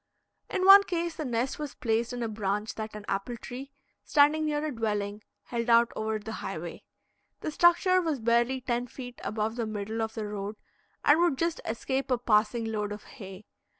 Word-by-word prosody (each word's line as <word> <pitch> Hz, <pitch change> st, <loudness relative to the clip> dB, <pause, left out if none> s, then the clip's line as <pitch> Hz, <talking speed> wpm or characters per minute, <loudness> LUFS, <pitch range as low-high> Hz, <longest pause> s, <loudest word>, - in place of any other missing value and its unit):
In 370 Hz, -, 0 dB
one 395 Hz, +1 st, +11 dB
case, 340 Hz, -2 st, -2 dB
the 310 Hz, -, -3 dB
nest 245 Hz, +2 st, -1 dB
was 295 Hz, -3 st, -5 dB
placed 230 Hz, 0 st, 0 dB
in 245 Hz, -1 st, -3 dB
a -, -, -1 dB
branch 210 Hz, 0 st, -2 dB
that 215 Hz, -1 st, -6 dB
an 210 Hz, -1 st, -8 dB
apple 200 Hz, +5 st, -2 dB
tree, 265 Hz, +4 st, -8 dB, 0.3 s
standing 300 Hz, +1 st, +4 dB
near 300 Hz, 0 st, -1 dB
a 305 Hz, -, -2 dB
dwelling, 210 Hz, -2 st, -2 dB, 0.2 s
held 235 Hz, 0 st, -3 dB
out 235 Hz, 0 st, +5 dB
over 215 Hz, 0 st, -1 dB
the 215 Hz, +1 st, -7 dB
highway. -, -, -5 dB, 0.6 s
The 310 Hz, -, -3 dB
structure 350 Hz, +3 st, +4 dB
was 315 Hz, -6 st, -1 dB
barely 235 Hz, +3 st, +2 dB
ten 245 Hz, -1 st, -1 dB
feet 245 Hz, 0 st, -9 dB
above 215 Hz, +2 st, -2 dB
the 230 Hz, -2 st, -1 dB
middle 215 Hz, +1 st, -3 dB
of 220 Hz, 0 st, -3 dB
the 220 Hz, -2 st, -3 dB
road, 205 Hz, 0 st, -5 dB, 0.5 s
and 295 Hz, +3 st, +6 dB
would 345 Hz, -6 st, +3 dB
just 335 Hz, +2 st, -1 dB
escape 265 Hz, +5 st, -2 dB
a 250 Hz, -, +3 dB
passing 230 Hz, 0 st, +2 dB
load 210 Hz, -2 st, -2 dB
of 210 Hz, 0 st, -6 dB
hay. 195 Hz, -4 st, -11 dB
235 Hz, 190 wpm, -28 LUFS, 215-280 Hz, 0.6 s, one